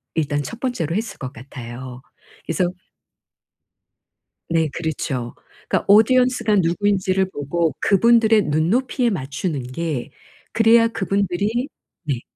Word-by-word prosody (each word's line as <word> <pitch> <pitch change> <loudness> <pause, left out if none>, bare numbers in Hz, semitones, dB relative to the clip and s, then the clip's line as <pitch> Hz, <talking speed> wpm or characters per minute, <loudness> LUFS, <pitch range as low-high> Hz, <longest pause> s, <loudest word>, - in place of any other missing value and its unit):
일단 145 -2 0
첫 230 +10 -7
번째로 175 - -2
했을 220 +2 -3
것 130 -3 -5
같아요. 125 -1 -9 0.4
그래서 170 +2 0 1.8
네. 165 -2 +1
그렇죠. 140 -7 -3 0.3
그러니까 - - 0
audience 250 +3 +4
가 210 -1 +3
누구인지를 190 +1 +1
보고 155 +1 -1
그분들의 225 +1 +4
눈높이에 225 - +1
맞추는 140 - -3
게. 130 +2 -4 0.4
그래야 230 +1 +5
그분들이 200 - -1 0.4
네. 135 -5 -2
175 Hz, 285 characters per minute, -21 LUFS, 145-225 Hz, 1.8 s, 그래야